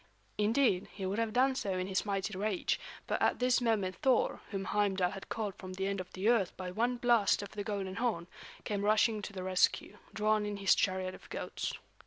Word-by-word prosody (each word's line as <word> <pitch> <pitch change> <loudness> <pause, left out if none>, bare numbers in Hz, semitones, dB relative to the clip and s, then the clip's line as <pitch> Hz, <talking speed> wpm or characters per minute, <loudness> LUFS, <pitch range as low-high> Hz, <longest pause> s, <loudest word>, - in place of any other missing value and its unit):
Indeed, 210 -3 +3
he 195 - -5
would 195 +4 -1
have 225 -1 0
done 260 +4 +3
so 200 -7 -2
in 185 - -1
his 190 +2 -1
mighty 195 0 -1
rage; 200 0 0 0.3
but - - -1
at - - +3
this 250 0 +3
moment 205 -6 0
Thor, 260 -2 +2
whom 195 -2 -3
Heimdal 195 -3 +1
had 195 -1 -9
called 215 -3 -2
from 185 -1 -7
the 190 +1 -2
end 200 -1 -1
of 185 - -11
the 190 +3 -1
earth 225 -6 +2
by 185 -1 -5
one 240 +6 0
blast 235 -5 +3
of 200 - -8
the 205 - -4
golden 200 -2 -3
horn, 225 -8 0 0.4
came 200 -1 -2
rushing 215 +1 +3
to 205 - -6
the 185 -2 -6
rescue, 185 +2 +1
drawn 215 0 +1
in 205 -1 -3
his 195 -1 +4
chariot 185 -2 0
of - - -13
goats. - - -4
205 Hz, 215 wpm, -32 LUFS, 190-220 Hz, 0.4 s, his